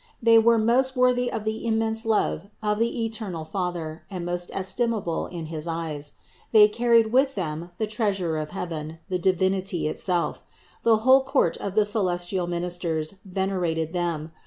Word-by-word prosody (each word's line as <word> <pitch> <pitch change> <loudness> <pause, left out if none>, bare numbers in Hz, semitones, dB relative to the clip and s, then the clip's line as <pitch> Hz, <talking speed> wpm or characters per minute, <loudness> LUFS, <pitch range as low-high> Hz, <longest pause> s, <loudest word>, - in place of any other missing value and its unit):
They 230 -1 +6
were 230 +1 +5
most 250 +4 +2
worthy 250 -1 +2
of 225 - -3
the 220 0 -3
immense 225 0 0
love 210 -4 +1 0.2
of 210 0 0
the 230 0 0
eternal 210 -8 -5
Father 170 -3 -4
and 180 -3 -5
most 175 0 -3
estimable 195 -3 -1
in 170 -3 -6
his 155 0 -6
eyes. 160 -3 -4 0.4
They 215 -2 +8
carried 230 0 +3
with 270 +1 +3
them 165 -2 -4
the 220 - 0
Treasure 200 -7 -1
of 155 -1 -3
heaven, 160 -3 -5
the 185 -1 -1
Deity 190 0 +1
itself. 175 +2 -1 0.4
The 225 -1 +4
whole 265 +1 +7
court 265 - +1
of 200 -1 -5
the 215 -1 +4
celestial 180 -3 0
ministers 175 -1 -3
ven 190 0 -2
erated 165 -3 -1
them. 170 -3 -2
190 Hz, 160 wpm, -25 LUFS, 170-225 Hz, 0.4 s, They